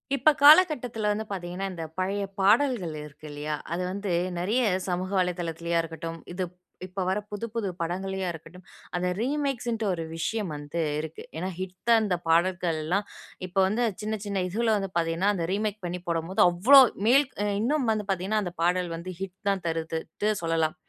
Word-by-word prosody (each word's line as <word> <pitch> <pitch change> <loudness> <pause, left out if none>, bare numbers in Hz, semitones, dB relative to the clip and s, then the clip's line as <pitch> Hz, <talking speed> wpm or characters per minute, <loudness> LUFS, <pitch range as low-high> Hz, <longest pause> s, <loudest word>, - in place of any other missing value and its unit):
இப்ப 275 - +5
காலகட்டத்துல 285 - +6
வந்து 215 +1 -2
பாத்தீங்கனா, 180 0 -4
இந்த 165 -2 -5 0.2
பழைய 200 +2 0 0.2
பாடல்கள் 205 - +3
இருக்கு 150 +1 -12
இல்லயா? 150 +1 -3 0.2
அது 175 - -1
வந்து 200 0 -3 0.3
நெறைய 210 +8 +1 0.3
சமூக 180 +1 -1
வலைதளத்துலயா 170 -1 -1
இருக்கட்டும், 165 0 -6
இது 185 +1 -2 0.4
இப்ப 190 +1 -3
வர்ற 190 +3 +1
புது 205 +2 -3
புது 225 -3 -1
படங்கள்லயா 190 +2 -2
இருக்கட்டும். 180 +3 -12 0.3
அந்த 180 +1 0
ரீமேக்ஸ்ன்டு 250 -4 -1
ஒரு 165 -2 -2
விஷயம் 205 +4 -2
வந்து 145 +3 -5 0.2
இருக்கு. 160 +1 -6
ஏன்னா 180 +3 -2
ஹிட்டா 185 +5 0
அந்த 205 -4 +1
பாடல்கள்லாம் 170 +1 +1 0.4
இப்ப 180 - -20
வந்து 220 +5 0 0.2
சின்ன 215 +1 -2
சின்ன 200 -2 -1
இதுல 220 +4 +1
வந்து 195 -1 -3
பாத்தீங்கன்னா 165 +4 +1
அந்த 175 -4 -2
ரீமேக் 210 +1 -1
பண்ணி 175 +1 -3
போடம்போது 170 +2 0
அவ்வளவு 245 +9 +7 0.2
மேல்க் 270 +2 +4 0.3
இன்னும் 265 +2 +1
வந்து 215 -1 -1
பாத்தீங்கன்னா, 195 +3 0
அந்த 175 - -5
பாடல் 180 0 +2
வந்து 170 +3 -6
ஹிட் 190 -1 -5
தான் 195 -2 0
தருதுன்னுட்டு 165 +5 -2
சொல்லலாம். 165 -1 +1
185 Hz, 160 wpm, -27 LUFS, 170-215 Hz, 0.4 s, அவ்வளவு